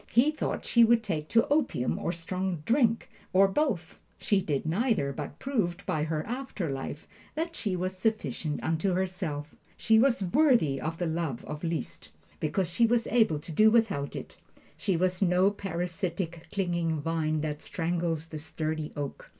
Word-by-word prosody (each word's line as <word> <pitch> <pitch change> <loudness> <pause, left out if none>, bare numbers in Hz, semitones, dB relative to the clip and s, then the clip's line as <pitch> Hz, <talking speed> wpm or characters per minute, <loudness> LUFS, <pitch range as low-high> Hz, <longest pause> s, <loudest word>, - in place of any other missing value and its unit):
He 260 +6 +5
thought 310 - -3
she 235 - +5
would 230 0 +5
take 155 -8 -2
to 230 +5 +3
opium 285 - +1
or - - -1
strong 180 0 -3
drink, 230 -1 +2 0.3
or 195 +1 +6
both. 195 - -1 0.2
She 200 -2 +2
did 145 -5 -1
neither, 170 - +1
but 145 +1 -6
proved, 200 -9 -1
by 155 -1 0
her 155 -1 -2
after 235 - -3
life, 135 +2 -5 0.3
that 330 +2 -2
she 200 -4 -1
was 185 +1 -2
sufficient 170 - -1
unto 165 +4 +1
herself. 180 -5 -3 0.2
She 220 -1 +4
was 240 -4 +3
worthy 185 - +3
of 160 +3 -3
the 175 - -1
love 160 -6 -2
of 150 +1 -6
Liszt, 165 -1 -4 0.3
because 190 -4 0
she 230 +7 +3
was 235 0 +2
able 220 -10 +3
to 165 - -9
do 215 +8 +6
without 215 -11 +1
it. - - -7 0.4
She 190 -5 0
was 185 +1 0
no 185 +1 +4
parasitic, 175 -2 -3
clinging 170 -5 0
vine 155 0 0
that 150 -1 -3
strangles 165 -2 -2
the 155 -2 -7
sturdy 155 0 -3
oak. 145 -1 -5
175 Hz, 165 wpm, -29 LUFS, 155-220 Hz, 0.4 s, or